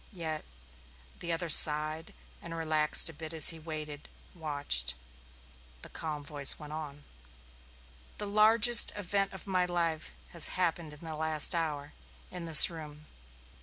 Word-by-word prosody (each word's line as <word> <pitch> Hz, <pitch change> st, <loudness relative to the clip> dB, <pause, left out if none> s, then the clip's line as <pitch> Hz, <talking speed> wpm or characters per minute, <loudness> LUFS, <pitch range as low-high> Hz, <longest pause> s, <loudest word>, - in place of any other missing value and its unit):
Yet 160 Hz, -4 st, -7 dB, 0.7 s
the 170 Hz, -, -5 dB
other 170 Hz, +1 st, -5 dB
sighed 155 Hz, +1 st, +1 dB, 0.3 s
and 170 Hz, -1 st, -11 dB
relaxed 155 Hz, -2 st, 0 dB
a 165 Hz, -, -1 dB
bit 160 Hz, +1 st, -11 dB
as 155 Hz, -, +7 dB
he 165 Hz, -, -5 dB
waited, 155 Hz, -2 st, -11 dB, 0.2 s
watched. 145 Hz, -, -3 dB, 0.9 s
The -, -, -11 dB
calm 150 Hz, -2 st, -9 dB
voice 145 Hz, -1 st, 0 dB
went 150 Hz, -1 st, -13 dB
on. 145 Hz, -2 st, -11 dB, 1.1 s
"The 210 Hz, -, -6 dB
largest 220 Hz, +3 st, +6 dB
event 200 Hz, 0 st, -5 dB
of 190 Hz, -, -12 dB
my 185 Hz, -2 st, -3 dB
life 170 Hz, -3 st, -5 dB, 0.2 s
has 170 Hz, -, +3 dB
happened 170 Hz, -3 st, -4 dB
in 150 Hz, -, -13 dB
the 160 Hz, -1 st, -9 dB
last 155 Hz, +2 st, +1 dB
hour, 150 Hz, -4 st, -7 dB, 0.4 s
in 180 Hz, -2 st, -10 dB
this 160 Hz, -2 st, +8 dB
room. 155 Hz, -2 st, -14 dB
160 Hz, 140 wpm, -27 LUFS, 150-170 Hz, 1.1 s, this